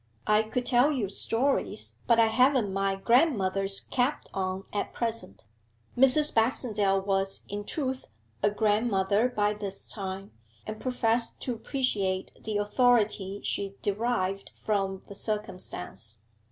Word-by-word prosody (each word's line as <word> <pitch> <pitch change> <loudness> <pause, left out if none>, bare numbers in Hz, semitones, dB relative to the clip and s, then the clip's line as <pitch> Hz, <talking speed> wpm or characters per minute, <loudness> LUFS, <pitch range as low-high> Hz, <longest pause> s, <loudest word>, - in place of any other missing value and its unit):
I 215 0 +4
could 230 +3 -3
tell 250 +4 +4
you 240 -9 -1
stories 245 +7 0
but 235 -1 +5
I 230 - +7
haven't 240 -2 +3
my 195 0 0
grandmother's 195 - +2
cap 260 +3 -1
on 190 0 -2
at 205 - -2
present.' 225 - -3 0.5
(Mrs. 270 +4 +4
Baxendale 215 -4 +2
was, 195 0 -1
in 205 +1 -5
truth, 265 -1 -3 0.3
a - - +4
grandmother 210 0 +2
by 210 -3 +1
this 200 -2 -5
time, 195 -1 -2 0.3
and 215 0 -6
professed 235 -2 0
to 250 - -1
appreciate 210 -7 -1
the 215 -1 -2
authority 205 -3 +2
she 200 -1 -2
derived 200 -2 -1
from 195 -3 -2
the - - -10
circumstance.) 115 - -5
210 Hz, 125 wpm, -28 LUFS, 195-245 Hz, 0.5 s, I